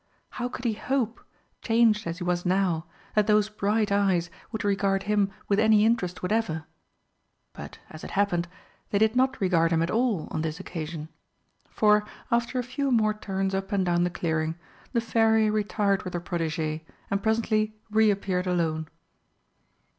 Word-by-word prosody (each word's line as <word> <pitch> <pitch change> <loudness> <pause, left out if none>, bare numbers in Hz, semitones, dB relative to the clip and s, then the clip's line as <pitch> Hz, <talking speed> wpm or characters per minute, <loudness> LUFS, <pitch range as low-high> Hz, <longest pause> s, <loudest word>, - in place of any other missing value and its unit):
How 245 0 -3
could 250 - -8
he 230 - +2
hope, 240 0 -2 0.4
changed 225 -3 +3
as 170 +1 -3
he 180 - -5
was 175 0 0
now, 180 -3 +1 0.3
that 210 -1 +2
those 210 -1 +3
bright 210 0 0
eyes 190 -4 +2 0.2
would 220 - -3
regard 195 -1 +1
him 205 -1 +2 0.2
with 200 0 +2
any 215 -1 +5
interest 185 -7 0
whatever? 180 -6 -1 0.9
But, - - -9
as 155 - -10
it - - -6
happened, 180 -4 +1 0.4
they 200 - +1
did 220 +2 +3
not 260 +1 +2
regard 170 -4 +3
him 165 -1 +2
at 170 - -1
all 225 -7 +1
on 155 - -2
this 160 +1 -3
occasion, 160 -4 -6 0.6
for, 210 -1 +4 0.3
after 235 +2 +1
a 250 - 0
few 275 +3 -2
more 215 -3 +3
turns 195 -2 -2
up 195 +1 -2
and 195 -2 +1
down 175 0 +2
the 175 - +1
clearing, 160 -2 -1 0.4
the 235 - +1
Fairy 225 -1 +3
retired 205 -2 +1
with 180 - -6
her - - 0
protégée, 160 -3 -2 0.3
and 200 0 +1
presently 220 -1 +1 0.2
re 220 0 +4
appeared 190 -2 -1
alone. 160 -3 0
200 Hz, 170 wpm, -27 LUFS, 175-220 Hz, 0.9 s, any